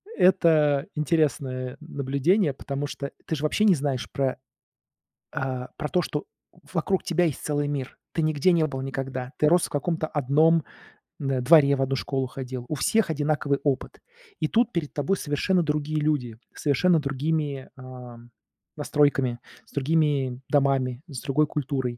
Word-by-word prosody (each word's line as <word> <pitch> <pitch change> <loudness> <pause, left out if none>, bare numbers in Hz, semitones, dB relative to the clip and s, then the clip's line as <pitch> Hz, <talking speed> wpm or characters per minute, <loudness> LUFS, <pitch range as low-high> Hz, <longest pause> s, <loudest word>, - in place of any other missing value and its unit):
Это 155 -6 +4
интересное 135 -4 0
н 155 - -11
наблюдение, 140 +5 +2
потому 140 +1 -4
что 140 -1 -6
ты 160 - -2
ж 145 - -6
вообще 155 +8 +2
не 195 - +6
знаешь 140 -4 -2
про, 135 -2 -1 1.0
э, 130 -1 -3
про 150 - -3
то, 180 - +1
что 150 -2 -3 0.5
вокруг 185 +2 0
тебя 175 +1 +2
есть 150 - -3
целый 145 -1 0
мир. 135 -3 -4
Ты 165 - 0
нигде 155 +3 +3
не 165 -2 +3
был 135 -3 -5
никогда, 135 -1 -4
ты 150 - +4
рос 175 +1 +4
в - - -14
каком-то 155 +2 -1
одном 155 +3 +3 0.6
н 135 -4 -1
дворе, 140 0 +6
в 135 - -2
одну 135 0 +1
школу 135 0 -2
ходил. 130 -1 -6
У 155 - -1
всех 220 +7 +2
одинаковый 145 -2 0
опыт. 135 -3 -1 0.4
И - - +2
тут 235 +6 +2
перед 165 -4 -2
тобой 150 +7 0
совершенно 165 +5 +1
другие 150 0 -1
люди, 130 -7 -1 0.2
с - - -11
совершенно 160 +4 +3
другими, 145 0 -2
э, 125 -2 -10 0.6
настройками, 135 -4 +1 0.3
с - - -23
другими 140 -3 +1
домами, 135 -3 +1
с 135 -6 -7
другой 150 +2 +1
культурой. 135 -4 -2
145 Hz, 160 wpm, -25 LUFS, 135-155 Hz, 1.0 s, не